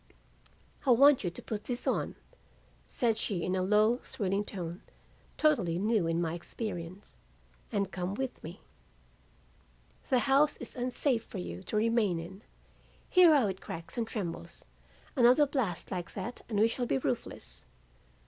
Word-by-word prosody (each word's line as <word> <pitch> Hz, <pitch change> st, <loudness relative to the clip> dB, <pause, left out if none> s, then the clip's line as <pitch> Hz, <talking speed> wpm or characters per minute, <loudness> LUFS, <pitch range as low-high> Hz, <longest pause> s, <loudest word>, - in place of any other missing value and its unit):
"'I 275 Hz, -, -1 dB
want 275 Hz, +2 st, +6 dB
you 180 Hz, -, 0 dB
to 170 Hz, -, -9 dB
put 215 Hz, -2 st, -5 dB
this 245 Hz, 0 st, -2 dB
on,' -, -, -1 dB, 0.7 s
said 225 Hz, -3 st, 0 dB
she 180 Hz, -5 st, -2 dB
in 185 Hz, -, 0 dB
a 185 Hz, -, 0 dB
low 210 Hz, +5 st, +3 dB
thrilling 200 Hz, -4 st, -2 dB
tone 175 Hz, -4 st, -5 dB, 0.6 s
totally 195 Hz, -, +2 dB
new 210 Hz, -2 st, +1 dB
in 165 Hz, 0 st, 0 dB
my 165 Hz, -2 st, -1 dB
experience, 175 Hz, 0 st, -7 dB, 0.5 s
'and 200 Hz, -2 st, -1 dB
come 185 Hz, +1 st, -3 dB
with 265 Hz, +2 st, -4 dB
me. -, -, -9 dB, 1.5 s
The 260 Hz, -, +4 dB
house 280 Hz, +4 st, +3 dB
is -, -, -7 dB
unsafe 250 Hz, -1 st, 0 dB
for -, -, -9 dB
you 90 Hz, 0 st, -6 dB
to -, -, -6 dB
remain 220 Hz, -5 st, +2 dB
in. 180 Hz, +4 st, -9 dB, 0.7 s
Hear 360 Hz, -3 st, +7 dB
how 270 Hz, -6 st, +4 dB
it 190 Hz, -2 st, -3 dB
cracks 165 Hz, 0 st, -7 dB
and 235 Hz, -2 st, -1 dB
trembles. 190 Hz, -8 st, -6 dB, 0.5 s
Another 255 Hz, +3 st, +6 dB
blast 250 Hz, -, -2 dB
like 180 Hz, -2 st, -5 dB
that 225 Hz, +5 st, -5 dB
and 210 Hz, -3 st, 0 dB
we 220 Hz, -, +6 dB
shall 240 Hz, +1 st, -2 dB
be 135 Hz, -, +1 dB
roofless. -, -, -4 dB
210 Hz, 155 wpm, -31 LUFS, 180-245 Hz, 1.5 s, Hear